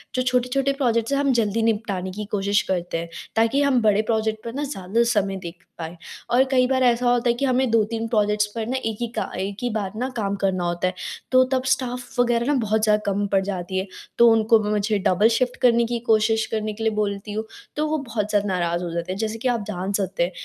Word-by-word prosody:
जो 255 - +1
छोटे-छोटे 255 +2 +1
प्रोजेक्ट्स 230 -3 +1
हैं 280 - +2
हम 280 -1 +2
जल्दी 225 -2 +1
निपटाने 210 -4 -1
की 210 +3 -5
कोशिश 200 0 +1
करते 175 -2 -1
हैं, 165 0 -5 0.3
ताकि 230 +5 +3
हम 275 -4 +3
बड़े 210 -1 +3
प्रोजेक्ट 220 0 -1
पर 230 - -5
ना 285 - -3
ज़्यादा 230 -5 0
समय 200 -2 0
देख 170 +2 -9
पाएँ। 165 0 -6 0.3
और 245 +2 +5
कई 255 -1 +4
बार 260 0 +1
ऐसा 245 0 +3
होता 245 0 +2
है - - +4
कि 275 - -1
हमें 260 -1 +2
2-3 225 0 +1
प्रोजेक्ट्स 210 -2 +2
पर 225 -1 -2
ना 260 +2 -1
एक 220 -2 -2
ही 240 - 0
का - - -2
एक 195 +1 -3
ही 245 - 0
बार 210 -4 -2
ना 255 +3 -2
काम 200 -2 -1
करना 185 -2 +1
होता 175 +1 -1
है 185 - -2 0.4
तो 255 0 +6
तब 260 - +1
स्टाफ 250 -1 -5
वगैरह 240 -1 +2
ना 290 - +3
बहुत 220 -1 0
ज़्यादा 210 -1 +3
कम 200 0 0
पड़ 195 -1 +2
जाती 190 -1 -4
है 190 - -4 0.3
तो 235 - +7
उनको 225 0 +4
ब 210 - -3
मुझे 210 0 +1
डबल 195 +4 +4
शिफ्ट 250 -1 -1
करने 235 -1 +4
की 235 0 -2
कोशिश 220 0 +3
करने 215 -1 -2
के 225 +2 -6
लिए 220 - +2
बोलती 205 0 -2
हूँ, 220 +1 -3 0.3
तो 305 +1 0
वो 310 - 0
बहुत 230 -7 -3
ज़्यादा 205 -1 +1
नाराज़ 175 -2 -1
हो 175 - -3
जाते 170 +2 -3
हैं, 190 - -4
जैसे 220 0 -2
कि 255 - -1
आप 235 -3 0
जान 190 -1 -3
सकते 190 -2 -1
हैं 175 - -1
220 Hz, 245 wpm, -23 LUFS, 200-240 Hz, 0.4 s, तो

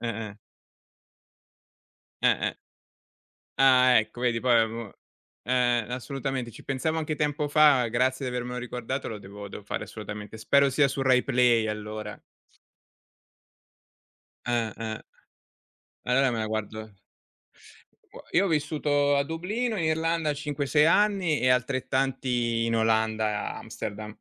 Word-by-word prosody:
Eh-eh. 110 -3 -5 1.9
Eh-eh. - - +2 1.0
Ah 130 -2 +6
ecco! 110 +2 -3
Vedi 120 -2 +1
poi 120 -2 +4
av 110 -1 +1
uhm. 115 -3 -7 0.5
Eh-eh. 120 -2 +1
Assolutamente, 130 -1 -4
ci - - -13
pensavo 155 +4 -1
anche 155 -1 -2
tempo 150 0 -1
fa, 145 -4 +5
grazie 130 +3 0
di 125 - -5
avermelo 125 0 -4
riguardato, 125 +2 -4
lo 110 - -6
devo 100 +1 -10
devo 105 - -9
fare - - -4
assolutamente, 105 0 -8
spero 140 +5 +3
sia 140 +2 +3
su 135 - -4
Rai 130 -1 +4
Play 120 -4 +3
allora. 105 0 -6 2.3
Eh-eh. 115 -2 -2 1.1
Allora 130 +1 +3
me 115 - -2
la 110 - -1
guardo 110 0 -5 1.4
io 185 - +4
ho 195 - 0
vissuto 145 -2 +1
a 140 - +2
Dublino 210 +9 -2
in 165 - -1
Irlanda 160 -1 0
5-6 150 0 +1
anni 190 -3 +3
e 125 - +2
altrettanti 125 -2 0
in 115 0 0
Olanda, 110 -1 0
Amsterdam. 105 +1 -7
125 Hz, 120 wpm, -27 LUFS, 110-145 Hz, 2.3 s, Ah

